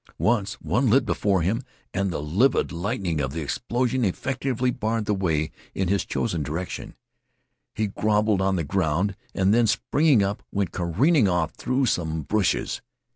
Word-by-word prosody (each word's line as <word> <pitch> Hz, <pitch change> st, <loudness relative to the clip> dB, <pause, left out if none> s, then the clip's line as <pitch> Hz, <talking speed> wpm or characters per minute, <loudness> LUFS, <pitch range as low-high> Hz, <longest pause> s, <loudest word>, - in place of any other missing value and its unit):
Once 110 Hz, -2 st, +1 dB
one 125 Hz, +1 st, 0 dB
lit 130 Hz, +6 st, +4 dB
before 95 Hz, -4 st, +1 dB
him 110 Hz, +8 st, 0 dB, 0.3 s
and 100 Hz, 0 st, 0 dB
the 80 Hz, -4 st, -3 dB
livid 100 Hz, -, +2 dB
lightning 85 Hz, -3 st, -2 dB
of 70 Hz, -1 st, -2 dB
the 80 Hz, -, -3 dB
explosion 125 Hz, -, -1 dB
effectually 130 Hz, +4 st, -1 dB
barred 110 Hz, -1 st, -1 dB
the 105 Hz, -, +1 dB
way 80 Hz, -6 st, 0 dB, 0.2 s
in 95 Hz, -2 st, 0 dB
his 100 Hz, 0 st, +2 dB
chosen 90 Hz, -9 st, -1 dB
direction. 80 Hz, +6 st, -5 dB, 0.8 s
He 110 Hz, -, 0 dB
groveled 105 Hz, 0 st, +1 dB
on 95 Hz, 0 st, +2 dB
the 85 Hz, -, 0 dB
ground 95 Hz, +4 st, 0 dB, 0.2 s
and 95 Hz, +1 st, +3 dB
then 115 Hz, 0 st, +4 dB
springing 130 Hz, +3 st, +3 dB
up 100 Hz, +1 st, -2 dB
went 100 Hz, -4 st, -1 dB
careering 110 Hz, -, +2 dB
off 90 Hz, -3 st, +1 dB
through 130 Hz, +1 st, 0 dB
some 80 Hz, -7 st, -1 dB
bushes. 100 Hz, +4 st, 0 dB
100 Hz, 160 wpm, -25 LUFS, 85-115 Hz, 0.8 s, lit